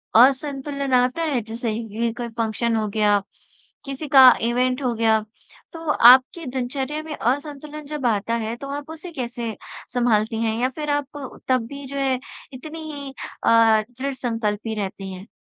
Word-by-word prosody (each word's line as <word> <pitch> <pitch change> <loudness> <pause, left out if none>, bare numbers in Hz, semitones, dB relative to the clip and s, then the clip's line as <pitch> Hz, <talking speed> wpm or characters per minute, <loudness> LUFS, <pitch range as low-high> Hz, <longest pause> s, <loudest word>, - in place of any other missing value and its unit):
असंतुलन 275 +2 +3
आता 250 +5 +3
है? 285 -7 0
जैसे 225 +1 -4
कि 230 +1 -2
कोई 240 -1 -4
फ़ंक्शन 230 0 -1
हो 215 -1 0
गया, 205 -1 +3 0.7
किसी 275 +2 -5
का 265 -2 +10 0.2
इवेंट 255 +2 +1
हो 245 -2 +1
गया, 220 -1 +3 0.5
तो 330 -1 -6
आपके 260 +6 +6
दिनचर्या 265 +3 -3
में 310 -1 -6
असंतुलन 290 +3 -3
जब 290 -3 -5
आता 220 0 +1
है, 225 +2 -3
तो 275 +3 -8
आप 285 +1 -5
उसे 325 +2 -9
कैसे 240 -6 -4 0.4
सँभालती 225 -2 +1
हैं 220 0 0
या 255 - +2
फ़िर 300 +3 -5
आप 285 -1 -7
तब 255 -3 +2
भी 280 +2 -8
जो 280 - -6
है, 265 -2 +1 0.3
इतनी 310 +4 -7
ही 280 -2 -7 0.3
अ, - - -1 0.5
दृढ़ 275 +1 -2
संकल्पी 225 -3 -2
रहती 195 -1 -5
हैं? 185 +4 -10
255 Hz, 165 wpm, -23 LUFS, 230-280 Hz, 0.7 s, का